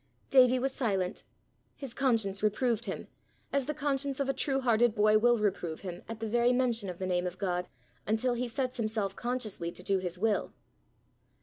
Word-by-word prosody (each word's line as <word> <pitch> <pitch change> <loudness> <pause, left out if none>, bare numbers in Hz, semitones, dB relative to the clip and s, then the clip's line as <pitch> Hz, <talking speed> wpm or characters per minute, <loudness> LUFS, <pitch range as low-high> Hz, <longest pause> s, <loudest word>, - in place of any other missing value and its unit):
Davie 255 -1 +6
was 265 +2 0
silent. 195 -7 -1 0.5
His 275 -5 -6
conscience 225 -8 +1
reproved 230 +2 +1
him, - - -5 0.5
as 275 -2 +1
the 300 - -1
conscience 280 -2 -1
of 275 - 0
a 275 - +1
true 270 +1 0
hearted 240 -2 +3
boy 215 0 +5
will 240 +1 +4
reprove 190 -6 -1
him 180 -2 -6
at 225 -1 -6
the 225 - -3
very 240 +2 +3
mention 235 -5 +1
of 180 - -6
the 185 - -3
name 180 -1 0
of 180 +1 -6
God, 180 -2 -1 0.4
until 220 +4 +1
he 245 +1 -2
sets 255 +2 -2
himself 215 -3 -1
consciously 225 -8 -2
to 180 - -11
do 195 0 +1
his 180 -1 -3
will. 210 +2 0
225 Hz, 190 wpm, -30 LUFS, 195-255 Hz, 0.5 s, Davie